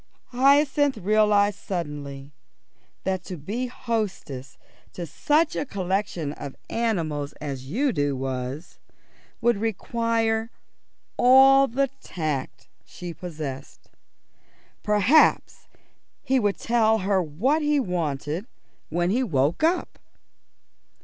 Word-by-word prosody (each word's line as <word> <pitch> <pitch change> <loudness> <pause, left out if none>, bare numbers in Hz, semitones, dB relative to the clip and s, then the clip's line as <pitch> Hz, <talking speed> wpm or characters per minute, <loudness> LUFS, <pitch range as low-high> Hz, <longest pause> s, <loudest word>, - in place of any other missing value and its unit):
Hyacinth 275 +1 +3
realised 205 0 +3
suddenly 145 -5 -5 0.7
that 190 -1 -1
to 180 - -6
be 215 - -3
hostess 195 - -4 0.4
to 175 - -5
such 300 - +1
a - - -1
collection 190 - -2
of 140 -2 -8 0.2
animals 165 -11 -1
as 135 -3 -7
Udo 160 - 0
was 130 +3 -5 0.6
would 240 -2 +3
require 225 +1 -1 0.7
all 270 +2 +7
the 275 +3 0
tact 135 -8 -4 0.2
she 175 -1 -8
possessed. 150 -6 -8 0.9
Perhaps 210 +9 +3 0.6
he 265 -1 +2
would 205 -3 0
tell 225 -2 +2
her 195 -1 +2
what 210 - 0
he 295 -1 +2
wanted 165 - -2 0.4
when 175 +3 0
he 245 +5 +1
woke 150 - +1
up. 345 +3 0
200 Hz, 100 wpm, -25 LUFS, 150-240 Hz, 0.9 s, all